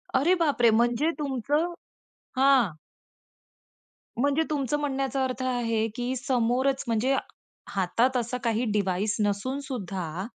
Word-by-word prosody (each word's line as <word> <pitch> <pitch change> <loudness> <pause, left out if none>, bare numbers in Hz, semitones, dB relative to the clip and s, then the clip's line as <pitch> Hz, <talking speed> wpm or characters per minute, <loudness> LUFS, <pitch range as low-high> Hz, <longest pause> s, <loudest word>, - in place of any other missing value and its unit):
अरे 290 +8 +4
बापरे! 280 -7 +3
म्हणजे 240 +7 +2
तुमचं 290 +5 0 0.6
हां. 260 - +4 1.5
म्हणजे 285 +3 +2
तुमचं 295 -1 0
म्हणण्याचा 275 -1 -1
अर्थ 255 0 -2
आहे 230 -3 0
की 250 +1 -2
समोरच 255 +2 +1
म्हणजे 235 +4 +2 0.5
हातात 230 +7 +1
असा 240 +1 -2
काही 230 0 +1
डिवाईस 205 0 0
नसूनसुद्धा 200 - -3
250 Hz, 105 wpm, -27 LUFS, 225-275 Hz, 1.5 s, अरे